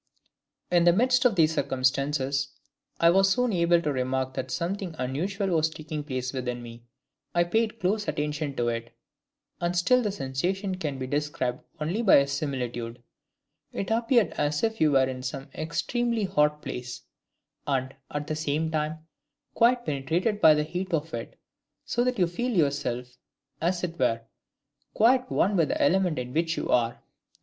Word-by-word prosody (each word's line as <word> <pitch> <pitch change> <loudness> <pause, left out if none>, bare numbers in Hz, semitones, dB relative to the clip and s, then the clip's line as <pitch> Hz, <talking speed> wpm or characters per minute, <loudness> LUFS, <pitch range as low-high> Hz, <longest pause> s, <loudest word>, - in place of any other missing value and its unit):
"In 175 -1 +4
the 175 - +6
midst 250 +5 +3
of 235 -5 +4
these 160 -2 +4
circumstances, 135 0 0 0.5
I 170 0 +6
was 195 +2 +4
soon 250 +3 +1
able 170 -1 +4
to 150 - 0
remark 130 0 -1
that 130 0 -4
something 170 +6 -3
unusual 185 +11 -2
was 160 -3 +2
taking 155 -1 -6
place 130 -3 -3
within 125 -2 -3
me. 115 0 -10 0.5
I 175 - +5
paid 220 +5 0
close 205 +3 0
attention 150 -1 -2
to 120 -2 0
it, 115 0 -5 0.6
and 175 +1 -1
still 250 +9 +4
the 210 -4 -1
sensation 185 +6 -2
can 155 -7 -3
be 130 - -4
described 145 -2 -2 0.2
only 170 +9 -1
by 185 -11 +6
similitude. 125 -5 -4 0.7
It 195 - -3
appeared 230 -3 +3
as 145 0 0
if 225 -3 0
you 155 -1 +5
were 135 -1 +4
in 130 -1 -5
some 135 +2 -5
extremely 230 +8 -1
hot 150 -5 +1
place, 125 0 -6 0.6
and, 135 -1 -1 0.2
at 145 0 -3
the 155 - -3
same 155 +1 -1
time, 155 0 -2 0.5
quite 240 +1 +3
penetrated 165 +9 -1
by 155 -1 +8
the 150 - +1
heat 180 +3 -2
of 160 +1 -4
it, 115 -1 -6 0.5
so 240 - 0
that 250 0 0
you 180 - +4
feel 210 +9 -2
yourself, 125 -5 -1 0.4
as 175 +2 0
it 170 -1 -4
were, 115 0 +2 0.7
quite 255 +3 +4
one 200 +3 +2
with 165 -4 +3
the - - -2
element 180 +1 +2
in 125 0 -4
which 165 +1 0
you - - -3
are. 120 0 +1
155 Hz, 165 wpm, -27 LUFS, 135-190 Hz, 0.7 s, by